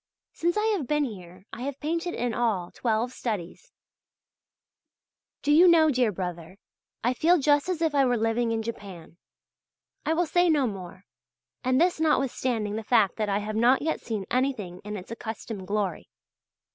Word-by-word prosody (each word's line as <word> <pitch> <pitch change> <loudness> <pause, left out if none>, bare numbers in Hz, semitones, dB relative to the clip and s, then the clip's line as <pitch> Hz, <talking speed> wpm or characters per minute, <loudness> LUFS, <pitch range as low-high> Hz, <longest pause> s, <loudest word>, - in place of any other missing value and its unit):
Since 345 +4 0
I 425 - +1
have 300 -10 -4
been 300 +2 +1
here 185 -6 -8
I - - -7
have 275 +1 -4
painted, 335 +3 -2
in 240 -1 -1
all, 215 -7 -1
twelve 235 +1 -1
studies. 215 - -5 1.7
Do 295 - +2
you 335 +5 +7
know, 320 -3 +6
dear 250 -4 +2
brother, 180 -1 -6 0.5
I 245 +2 +2
feel 335 +7 +4
just 290 +2 +2
as 340 -3 -1
if 320 -2 +1
I 275 -2 +4
were 245 -1 +2
living 225 +1 0
in 225 -1 -1
Japan. 195 -7 -8 0.9
I 320 - 0
will 350 +2 +2
say 350 +2 +2
no 295 -4 +3
more. 185 -3 -7 0.6
And 255 0 +2
this 350 0 +2
notwithstanding 250 -8 0
the 220 - -4
fact 215 -4 +3
that 215 -2 -1
I 200 - +1
have 210 +1 -4
not 245 +5 +4
yet 320 - -1
seen 215 -4 -4
anything 235 -9 -1
in 210 0 -5
its 185 +3 -10
accustomed 220 -3 -6
glory. 200 -3 -2
235 Hz, 170 wpm, -26 LUFS, 205-295 Hz, 1.7 s, you